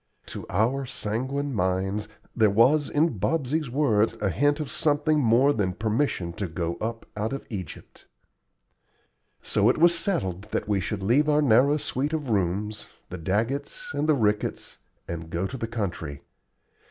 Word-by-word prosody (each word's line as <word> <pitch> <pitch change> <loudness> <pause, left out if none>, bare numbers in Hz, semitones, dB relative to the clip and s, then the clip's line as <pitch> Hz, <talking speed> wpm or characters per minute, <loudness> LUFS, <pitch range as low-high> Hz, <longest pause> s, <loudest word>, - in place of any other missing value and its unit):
To - - -8
our 115 +9 +1
sanguine 130 +7 -2
minds 95 +1 -1 0.3
there 110 -3 +4
was 130 +9 +4
in 150 - +1
Bobsey's 155 - 0
words 115 -5 +2
a 100 -2 0
hint 145 - +2
of 150 - -4
something 155 0 +2
more 130 +3 +4
than 95 -6 0
permission 110 -4 -1
to 100 - -2
go 85 +1 -3
up 115 +1 -4
out 110 +4 -2
of 135 - -5
Egypt. 95 -7 -8 1.4
So 105 +2 +2
it - - +2
was 170 +2 +5
settled 105 - -1
that 105 - -3
we 105 -2 +1
should 100 +2 -3
leave 140 +9 +3
our 150 0 +3
narrow 135 +4 +4
suite 145 +1 -2
of 150 -6 -2
rooms, 105 +2 -1 0.2
the 90 - -5
Daggetts 135 - -2
and 155 - -1
the 155 - +5
Ricketts, 105 -4 -1 0.3
and 85 -1 -6
go 85 +3 -2
to 110 - -5
the 115 -3 -3
country. 90 -10 -4
115 Hz, 160 wpm, -26 LUFS, 100-145 Hz, 1.4 s, was